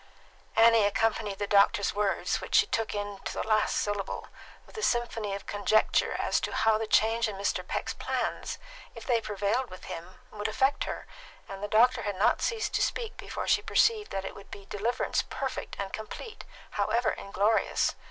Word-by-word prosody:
Annie 225 -1 +6
accompanied 210 -1 +1
the 205 - -1
doctor's 200 0 +3
words, 205 -1 0
which - - -3
she 440 - +7
took 225 - -2
in 205 -1 -4
to - - -4
the - - -3
last 215 -1 +2
syllable, 205 -1 -2 0.4
with - - -18
a 435 - -4
symphony 230 - 0
of 200 - -8
conjecture 205 +1 +2
as - - +1
to - - -3
how 220 -1 +3
the 220 - -2
change 225 +2 +3
in 210 - -5
Mr. 200 +1 -1
Peck's - - -2
plans, - - -3 0.4
if 230 - -9
they 235 -2 +2
prevailed 210 +5 -1
with 185 - -11
him, 170 +3 -8 0.2
would 210 0 -3
affect 265 +6 +1
her, - - -5 0.4
and 195 0 -8
the 205 - -2
doctor 230 +4 +4
had 205 -1 -3
not 200 - +3
ceased 455 -2 -1
to - - +1
speak 465 -1 -1
before - - -5
she - - +4
perceived 435 -2 +2
that 195 0 -3
it - - -5
would 200 - -13
be 200 - -10
deliverance 210 +5 -1
perfect - - -4
and 195 -1 -4
complete, 320 - -7 0.3
however 215 +3 +1
inglorious. 205 +3 +1
215 Hz, 185 wpm, -29 LUFS, 200-230 Hz, 0.4 s, she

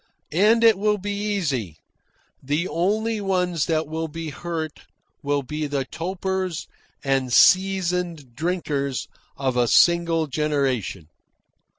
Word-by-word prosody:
And 215 +7 +4
it 225 -4 +6
will 210 0 +2
be 205 +1 -4
easy. 170 - -2 0.6
The 150 +6 -1
only 215 +6 0
ones 180 -5 0
that 160 -1 +1
will 160 +2 -3
be 160 0 -6
hurt 160 0 -5 0.4
will 145 -1 0
be 150 +3 -3
the 140 -2 -2
topers 185 +1 -3 0.4
and 135 -2 0
seasoned 180 -5 +3
drinkers 145 -4 -2 0.3
of 130 -2 -1
a 120 -1 +3
single 170 +2 +4
generation. 135 - -1
165 Hz, 115 wpm, -23 LUFS, 140-185 Hz, 0.6 s, it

